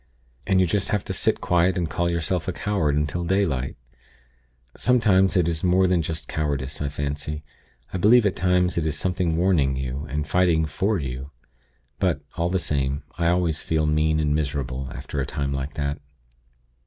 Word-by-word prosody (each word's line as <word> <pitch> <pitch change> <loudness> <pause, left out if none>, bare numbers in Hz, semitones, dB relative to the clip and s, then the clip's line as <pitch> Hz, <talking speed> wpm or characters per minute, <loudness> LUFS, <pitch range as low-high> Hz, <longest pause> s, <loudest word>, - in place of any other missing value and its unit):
And 95 - +3
you 95 - +4
just 100 +3 0
have 105 -2 0
to - - -3
sit - - +1
quiet 90 +1 +2
and 85 -2 0
call 85 +1 -1
yourself 85 +1 -1
a - - +1
coward 95 -9 0
until 75 +4 -1
daylight. 85 -9 0 1.0
Sometimes 105 -6 +3
it 85 -2 +3
is 80 -2 -1
more 90 +1 +4
than 90 -2 +2
just 80 0 -4
cowardice, 70 -2 -2
I 75 - 0
fancy. 75 +2 -4 0.5
I 95 - -1
believe 110 +5 +6
at 100 - +1
times 90 -1 +2
it 80 - -1
is 80 - -1
something 90 -3 0
warning 85 -7 +2
you, 65 +2 -4
and 75 +2 -2
fighting 85 -2 +3
for 95 +8 0
you. 65 -2 -5 0.7
But, - - +1
all 85 +1 0
the 95 - +1
same, 70 -4 -1 0.2
I 85 - +2
always 85 -2 +1
feel 80 -1 0
mean 75 +1 +2
and 75 -1 +1
miserable, 70 -3 -2
after 70 - -4
a - - -1
time 70 -1 -2
like 70 +1 -4
that. 70 0 -2
80 Hz, 180 wpm, -24 LUFS, 70-90 Hz, 1.0 s, believe